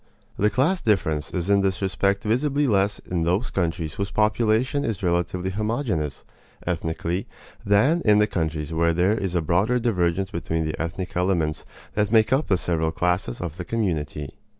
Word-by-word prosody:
The 105 - +2
class 145 - +1
difference 80 - +1
is 90 -1 -3
in 100 0 +4
this 95 -1 0
respect 100 +1 0
visibly 140 +6 +1
less 100 -4 +2
in 90 -2 -3
those 90 +9 0
countries 85 -4 -1
whose 100 0 -3
population 110 +6 +1
is 105 -4 -3
relatively 90 +1 0
homogeneous, 105 - -2 0.4
ethnically, 85 +1 -2 0.4
than 130 +12 +3
in 105 -2 +5
the 105 - +5
countries 80 -5 -2
where 85 0 +2
there 90 +5 +3
is 95 -5 -2
a 85 - +1
broader 95 +9 +2
divergence 95 -5 0
between 80 -1 -2
the 80 - -3
ethnic 85 +3 -4
elements 85 -4 0 0.3
that 105 0 0
make 115 +2 +4
up 140 +4 +1
the 95 - +3
several 80 -2 0
classes 90 -6 -1
of 85 -2 -5
the 90 - -4
community. 80 -9 -2
95 Hz, 170 wpm, -24 LUFS, 85-105 Hz, 0.4 s, in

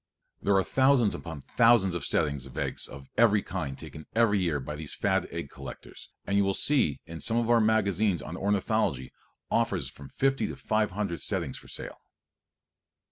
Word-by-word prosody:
There 100 - +2
are 95 - +3
thousands 130 -3 +3
upon 80 -4 -7
thousands 115 -6 +5
of 85 - -3
settings 70 -3 0
of 65 - -13
eggs - - -1
of 70 -1 -12
every 105 -3 +5
kind 70 -8 -4
taken 75 - -10
every 110 -3 +4
year 85 -6 0
by 70 +3 -6
these 75 -1 -4
fad - - +1
egg - - -6
collectors - - -10 0.2
and 100 - -1
you 100 - +4
will 95 0 +1
see 135 - +2
in 80 0 -8
some 115 +6 +2
of 120 0 +1
our 120 -1 +5
magazines 105 -5 +2
on 80 - -6
ornithology 100 - 0 0.4
offers - - +1
of - - -19
from 70 -1 -12
fifty 135 - +1
to - - -6
five 110 -4 0
hundred 95 -3 -3
settings - - -2
for - - -16
sale. - - -6
100 Hz, 190 wpm, -28 LUFS, 80-110 Hz, 0.4 s, thousands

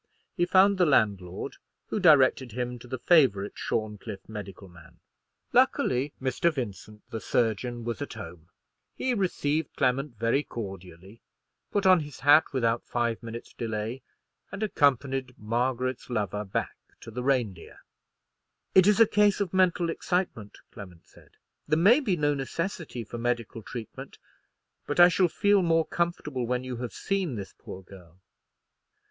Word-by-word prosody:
He 175 -2 +1
found 195 +1 +4
the 180 - +5
landlord, 100 -9 0 0.3
who - - -1
directed 135 - +4
him 125 0 -4
to 120 - -13
the 130 +1 -4
favourite 120 - +3
Shorncliffe 105 -3 -4
medical 100 -3 -8
man. 85 -2 -17 0.5
Luckily, 130 +4 +2
Mr. 130 +6 +1
Vincent, 110 -6 -7
the 110 - -4
surgeon, 120 +1 -1
was 120 +3 -4
at 145 - -5
home. 85 -6 -10 0.5
He 260 - -1
received 160 - -1
Clement 130 0 0
very 115 +6 +1
cordially, 95 - -9 0.5
put 200 -2 -1
on 185 -1 +7
his 145 -3 -8
hat 145 +4 +6
without 115 -4 0
five 120 -2 -1
minutes 115 0 -8
delay, 115 +2 -4 0.5
and 200 - -4
accompanied 135 - +1
Margaret's 125 +4 -2
lover 105 -3 -2
back 95 - -3 0.2
to - - -10
the 125 +3 -4
Reindeer. 120 -9 -1 1.0
"It 190 0 +6
is 210 +1 +4
a 225 - +9
case 205 -1 +3
of 195 -4 -2
mental 180 -2 +2
excitement," 170 - -3
Clement 90 -6 -12
said. - - -22 0.3
"There 155 +1 +2
may 205 - +6
be 205 -11 0
no 145 -1 +2
necessity 145 -1 -4
for 115 +2 -8
medical 120 -1 -2
treatment; 115 0 -9 0.7
but 145 - -2
I 175 0 +9
shall 180 +1 +3
feel 205 +4 +2
more 165 -2 +2
comfortable 150 -7 -2
when 125 +1 -1
you 130 -1 -5
have 120 -1 -5
seen 190 -9 -2
this 100 -3 -7
poor 95 - -10
girl." 90 -2 -16
125 Hz, 150 wpm, -27 LUFS, 110-165 Hz, 1.0 s, a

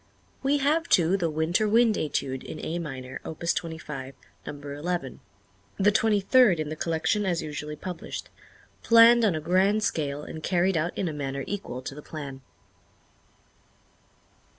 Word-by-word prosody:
We 275 +2 +2
have, 305 +4 +1
too, 175 +1 +4
the 175 -4 0
"Winter 160 +7 +1
Wind 230 +1 +4
Étude," 135 -6 -2
in - - -7
A 170 +2 -2
minor, 130 -5 -6
Opus 170 +2 -2
25, 150 -5 -6 0.3
number 145 -1 -6
eleven 175 +4 -3 0.6
the 205 +1 +4
twenty 215 0 +3
third 200 -3 +5
in 155 -1 -2
the 155 - -4
collection 165 +6 0
as 175 -4 -1
usually 150 0 -5
published 175 +2 -7 0.5
planned 230 +1 +7
on 200 -7 +3
a - - -1
grand 190 +6 +2
scale 145 -6 -1
and 155 - -8
carried 180 +3 +1
out 165 +2 -1
in 190 - -1
a 160 - -3
manner 140 -2 -4
equal 160 -11 -5
to 135 - -6
the 150 - -9
plan. 140 -4 -8
165 Hz, 155 wpm, -26 LUFS, 150-200 Hz, 0.6 s, planned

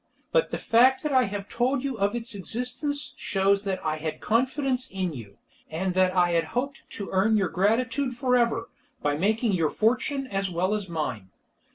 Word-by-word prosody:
But - - +2
the - - -3
fact 255 +5 +4
that 300 - -1
I 260 -2 +4
have 200 -1 -5
told 250 +2 0
you 275 -2 -2
of 200 +3 +1
its 235 +1 -3
existence 250 - -3
shows 195 +1 +1
that 190 -1 -3
I 155 - 0
had 155 0 -4
confidence 260 +2 0
in 185 -3 -2
you, 115 -7 -10 0.3
and 180 +4 -2
that 185 0 +2
I 175 -2 +3
hoped 250 - -3 0.2
to 200 - -5
earn 205 +4 +3
your 195 -4 +1
gratitude 240 +6 +1
for 250 0 +1
ever, 235 -1 +1 0.3
by 145 0 +1
making 215 - +1
your 165 -5 +2
fortune 255 - 0
as 195 -5 -2
well 180 +3 0
as 205 -3 -3
mine. 130 - -3
210 Hz, 185 wpm, -26 LUFS, 185-250 Hz, 0.3 s, fact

